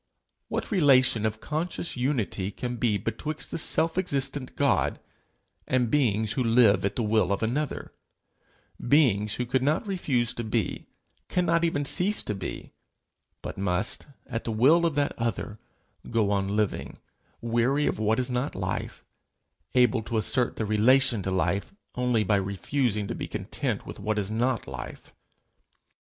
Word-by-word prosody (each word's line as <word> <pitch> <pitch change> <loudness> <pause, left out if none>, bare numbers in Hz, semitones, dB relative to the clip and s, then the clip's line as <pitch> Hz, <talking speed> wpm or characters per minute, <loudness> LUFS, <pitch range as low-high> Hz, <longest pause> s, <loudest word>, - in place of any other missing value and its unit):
What - - -4
relation 130 - +4
of 110 0 -4
conscious 165 +5 -3
unity 125 -7 -1
can 120 +3 -5
be 115 -4 +1
betwixt 155 +9 -4
the - - -3
self 165 +3 +2
existent 140 -6 -2
God, 140 -2 +1 0.7
and 125 -3 +1
beings 110 -7 +2
who 125 +3 0
live 115 -4 +4
at 100 0 -1
the 120 - 0
will 105 -3 +2
of 100 - 0
another, 135 +6 -2 0.9
beings 110 -7 +3
who 125 - -2
could 125 +2 0
not 150 - +1
refuse 140 - 0
to 120 - -4
be 110 - -2 0.4
cannot 170 -2 +2
even 145 -4 0
cease 195 +8 +2
to 105 - -2
be, 95 -3 -6 0.7
but - - -6
must, 90 +5 -1 0.2
at 115 -3 -4
the 115 - -3
will 150 +10 +4
of 160 - -3
that 145 -1 +1
other, 110 -2 -3 0.5
go 110 -3 +1
on 100 -1 +1
living, 105 0 -2 0.4
weary 120 +5 +1
of - - -1
what 110 +2 +1
is 125 0 -2
not 125 +4 -2
life, 95 -1 -4 0.7
able 125 -2 +4
to 110 +1 -3
assert 125 +3 +1
their 110 - -2
relation 115 +2 +3
to 95 - -3
life 100 - -1 0.2
only 125 -3 +1
by 105 +1 +2
refusing 100 +3 -1
to - - -3
be - - -5
content - - -3
with - - -8
what 110 0 -1
is 105 0 -1
not 120 +2 0
life? 65 -2 -8
120 Hz, 155 wpm, -27 LUFS, 105-140 Hz, 0.9 s, relation